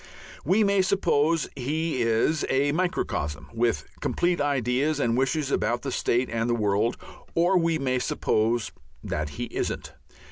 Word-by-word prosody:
We 195 +8 +3
may 200 -1 +3
suppose 165 -5 +2
he 150 +1 -1
is 115 +7 +2
a 140 +2 +2
microcosm, 145 - -2
with 115 0 0
complete 175 -2 0
ideas 140 +1 +1
and 115 -4 +1
wishes 135 +2 0
about 120 0 0
the 135 - -3
state 125 +1 +1
and 115 0 -1
the 120 - +2
world, 105 +1 +1 0.4
or 175 +3 +3
we 165 -2 +2
may 130 -3 0
suppose 110 -1 0 0.3
that 75 0 -3
he - - -2
isn't. - - -3
135 Hz, 145 wpm, -26 LUFS, 115-160 Hz, 0.4 s, We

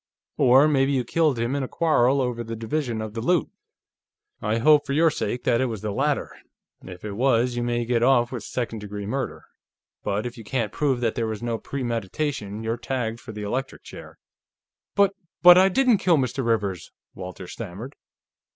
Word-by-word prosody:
Or 130 +4 +6
maybe 140 -2 +2
you 130 -2 +1
killed 150 +1 +1
him 115 +3 -1
in 140 - -1
a 130 - -3
quarrel 140 -5 +2
over 120 -2 -2
the 115 0 -6
division 115 0 -2
of 110 -1 -7
the 115 - -4
loot. 175 +7 +1 0.9
I 110 +2 0
hope, 150 +5 +5
for 140 - -1
your 160 +2 +4
sake, 120 -3 -3
that 120 0 +2
it 130 - +1
was 110 -5 -5
the 105 - -3
latter; - - -1 0.5
if 90 +2 -10
it 105 - -4
was, 120 +2 +1
you 120 - -1
may 120 0 -1
get 120 -1 +1
off 120 -1 +3
with 125 -3 -4
second 115 0 -4
degree 105 -1 -6
murder. 130 +6 -3 0.6
But 105 +2 -2
if 120 0 -6
you - - -9
can't 110 0 -2
prove 135 -3 0
that 115 -2 +1
there 115 -1 -2
was 110 +1 -5
no 115 -2 -2
premeditation, 115 -2 -3
you're 115 +1 -2
tagged 120 -2 -3
for 120 - -10
the 105 -1 -7
electric 130 +6 -4
chair." - - -11 0.8
"But... 200 -1 +4 0.3
But 175 0 +10
I 190 +1 +5
didn't 245 +1 +3
kill 175 -3 +3
Mr. 130 0 -1
Rivers," 105 -6 -1 0.2
Walters 90 -1 -8
stammered. 115 +5 -7
120 Hz, 195 wpm, -24 LUFS, 110-135 Hz, 0.9 s, But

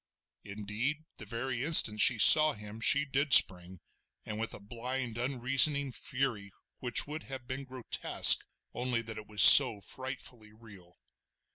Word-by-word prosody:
Indeed, 105 +10 -10
the 105 - -15
very 120 +2 -10
instant 130 -9 +3
she 120 +1 +1
saw 155 +8 +5
him 105 +1 -16
she 145 +3 0
did 140 0 -5
spring, 90 0 +2 0.5
and 105 0 -12
with 115 0 -9
a - - -16
blind 120 +3 -11
unreasoning 135 +3 -1
fury, 120 -6 -9 0.3
which 125 -1 -4
would 155 +2 -12
have 135 -2 -13
been 130 +2 -12
grotesque, 130 -2 +1 0.3
only 120 -1 -8
that 110 -1 -13
it 105 - -18
was 105 -2 0
so 125 -7 +7
frightfully 120 -1 -13
real. 100 -6 -23
120 Hz, 145 wpm, -25 LUFS, 105-135 Hz, 0.5 s, so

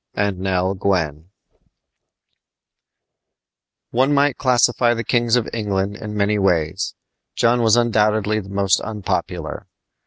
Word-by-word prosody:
AND 100 -2 -1
NELL 95 0 0
GWYN 90 -5 -2 2.6
One 130 +4 +2
might 140 -1 +2
classify 120 -2 +2
the 115 - -3
kings 120 +1 +1
of 120 -3 0
England 100 -2 -2
in 105 0 -7
many 105 +1 +1
ways. 90 -1 0 0.4
John 120 +1 +2
was 110 -1 +4
undoubtedly 110 -2 +1
the 95 -2 -10
most 100 -1 +1
unpopular. 105 -3 -4
105 Hz, 115 wpm, -20 LUFS, 95-115 Hz, 2.6 s, was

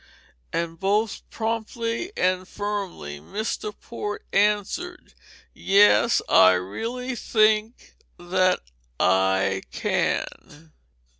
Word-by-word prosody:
And 165 -1 -3
both 205 +2 0
promptly 230 - -3
and 185 0 +1
firmly 195 - -5
Mr. 210 - -4
Port 210 -3 -6
answered: 210 - 0 0.4
"Yes, 195 - +4
I 95 - +7
really 230 - -4
think 215 0 +1 0.2
that 185 +1 +1 0.4
I 95 +1 +2
can." 155 +2 -3
205 Hz, 80 wpm, -24 LUFS, 165-220 Hz, 0.4 s, I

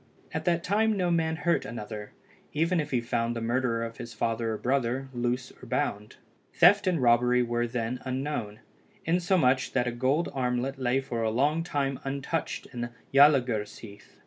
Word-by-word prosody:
At - - -3
that 170 -1 +1
time 215 +2 +2
no 180 -2 +1
man 160 -1 +1
hurt 170 +1 +1
another, 105 -2 -7 0.4
even 165 +3 +1
if 150 - -2
he 125 -3 +1
found 115 0 -1
the - - -2
murderer 115 0 0
of 115 0 -8
his 115 -1 -8
father 115 +1 -1
or - - -3
brother, 130 +1 -1
loose 125 +1 -2
or 125 - -11
bound. 105 -1 -2 0.4
Theft 195 +3 +6
and 180 -3 +2
robbery 125 0 +4
were 120 0 -1
then 120 +1 -3
unknown, 130 -5 -3 0.4
insomuch 170 -7 +2
that 125 -2 +2
a 120 - -1
gold 130 +7 +1
armlet 130 +1 -1
lay 130 +1 +1
for 120 -3 -4
a 110 - +1
long 145 +8 +1
time 140 -5 -2
untouched 140 +4 -3
in 120 -1 -4 0.2
Jalangursheath. 120 -7 +2
125 Hz, 170 wpm, -28 LUFS, 120-150 Hz, 0.4 s, Theft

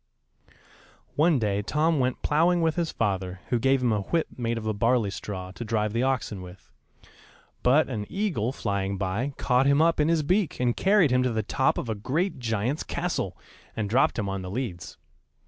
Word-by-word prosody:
] - - -26 0.3
One 155 0 +4
day 105 -4 0
Tom 155 +7 +1
went 130 0 -1
ploughing 170 +3 +3
with 160 -1 +1
his 170 -2 -1
father, 95 -4 -2
who 120 -3 +1
gave 135 +1 +2
him 120 - +2
a 105 - +1
whip 165 +11 0
made 115 -1 -2
of 110 - -5
a 110 - 0
barley 115 0 +1
straw, 95 -2 -6
to 110 - -7
drive 105 -1 -1
the 115 - 0
oxen 130 -7 -1
with; 90 +1 -13 0.9
but 140 +5 +4
an 105 -6 -4
eagle, 170 - -1
flying 100 -5 -2
by, 105 +9 -2
caught 125 +1 +2
him 140 +1 +4
up 165 0 +3
in 150 - +3
his 165 -2 +2
beak, 185 +2 0
and 125 -1 +1
carried 195 -7 +3
him 125 0 +3
to 125 -1 +1
the 110 -1 -1
top 130 +6 +1
of - - -3
a 110 - -1
great 135 - -2
giant's 115 +4 -1
castle, 170 - -3 0.4
and 105 -2 -3
dropped 130 +4 +3
him 105 -3 -1
on 95 0 -3
the 90 - -6
leads. 100 -6 -5
120 Hz, 200 wpm, -26 LUFS, 105-150 Hz, 0.9 s, One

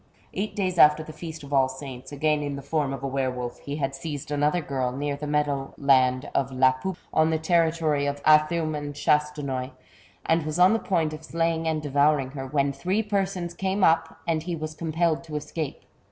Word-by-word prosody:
Eight 210 +2 -3
days 185 -3 -1
after 150 +1 +6
the 155 - -10
feast 160 -2 -8
of 140 0 -8
All 135 -1 +4
Saints, 130 -1 -9
again 150 +1 +1
in 145 -1 -3
the 140 - -7
form 150 -2 -1
of 135 - -6
a - - -1
were 135 -1 0
wolf, 125 -1 -5
he 140 - -5
had 135 -2 -2
seized 145 +1 -6
another 150 +4 +2
girl, 135 -5 -2
near 140 +2 -2
the 150 +1 -6
meadow 145 -2 -1
land 130 -1 +3
of 135 -1 0
La 130 0 +4
Pouppe, 170 +8 -5 0.2
on 155 0 +4
the 160 - +1
territory 160 -3 +1
of 140 0 -2
Athume 155 +1 +4
and 145 -1 -5
Chastenoy, 145 -3 0 0.6
and 165 0 +2
was 155 +1 -3
on 180 +3 +6
the 225 - +1
point 165 -7 0
of 155 +1 -8
slaying 165 0 -1
anA 155 -1 0
devouring 145 -1 +2
her, 135 -1 -6
when 140 0 +1
three 190 +9 -1
persons 195 -4 -2
came 190 +2 -1
up, 165 -1 +3
and 160 -2 +1
he 175 +1 -3
was 155 -1 -5
compelled 165 +1 0
to 155 -2 -7
escape. 150 0 -4
150 Hz, 210 wpm, -26 LUFS, 140-165 Hz, 0.6 s, after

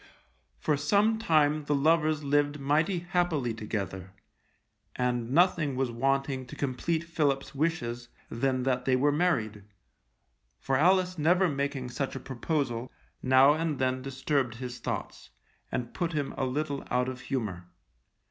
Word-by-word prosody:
For 145 - 0
some 205 +9 +2
time 155 -6 +2
the 145 - +1
lovers 155 +1 +2
lived 145 +1 +1
mighty 155 +6 +1
happily 165 -9 0
together, 95 -4 -5 0.8
and 125 -2 -1
nothing 160 -2 +3
was 130 -2 0
wanting 135 +1 0
to - - -9
complete 150 +5 -1
Philip's 145 -5 -1
wishes 125 -6 -2 0.2
than 130 +2 -1
that 125 -1 0
they 130 - +3
were 145 +3 +3
married, 120 - 0 0.9
for 135 - -1
Alice 180 +3 +3
never 180 +5 +4
making 140 -3 -2
such 130 +3 -3
a - - -4
proposal, 130 -2 -2 0.3
now 130 +2 +6
and 160 -2 -1
then 130 0 0
disturbed 135 -2 -1
his 125 0 -6
thoughts, - - -5 0.4
and 120 -1 -3
put 170 -1 -2
him 145 -3 -2
a 135 - -1
little 140 +2 -2
out 125 0 +1
of 130 0 -5
humour. 105 -11 -3
135 Hz, 140 wpm, -29 LUFS, 125-155 Hz, 0.9 s, now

